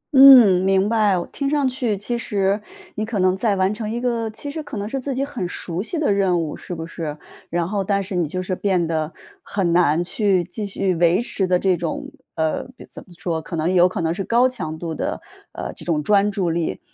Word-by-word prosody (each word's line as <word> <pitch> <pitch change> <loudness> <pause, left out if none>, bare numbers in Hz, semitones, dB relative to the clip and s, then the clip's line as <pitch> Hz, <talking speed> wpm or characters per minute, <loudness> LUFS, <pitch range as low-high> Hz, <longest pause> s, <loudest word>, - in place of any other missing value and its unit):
嗯， 250 -9 +9
明 195 +1 +3
白， 210 -5 +3
我 175 - -2
听 280 -1 -3
上 285 -2 +2
去 250 -5 -1
其 235 +4 -3
实 200 -2 0 0.3
你 215 - -3
可 220 -1 -3
能 185 0 +3
在 205 0 +1
完 190 +2 +1
成 215 0 -5
一 235 - -2
个 235 -2 -1
其 285 +6 -8
实 315 - -5
可 285 -7 -7
能 205 +1 -3
是 270 +4 -3
自 265 0 -4
己 275 - 0
很 240 -11 -4
熟 175 0 -4
悉 330 - -4
的 305 -8 +1
任 190 -3 +2
务 160 -3 -3
是 180 - -7
不 165 0 -5
是？ 155 -3 -6 0.3
然 170 0 -1
后 200 0 -1
但 200 0 0
是 190 - -7
你 175 -3 +1
就 185 +5 -4
是 185 - -3
变 185 -3 +1
得 160 -1 -2 0.3
很 180 -4 -1
难 170 -1 +3
去 190 -1 +1
继 200 +4 -6
续 195 -1 -1
维 170 +1 +3
持 205 -5 -1
的 180 0 +3
这 185 0 +2
种 170 -1 -4 0.2
呃， 160 -1 0
比 - - -11
怎 - - -10
么 - - -18
说， 165 -2 -2
可 165 - -7
能 165 +3 0
有 180 0 +5
可 180 - -4
能 165 0 0
是 195 +2 -3
高 240 +4 +3
强 160 -11 -5
度 165 0 -4
的， - - -3 0.3
呃， - - -5
这 - - -12
种 155 -3 0
专 205 +3 +3
注 190 -4 -1
力。 165 0 -2
190 Hz, 260 characters per minute, -21 LUFS, 175-220 Hz, 0.3 s, 嗯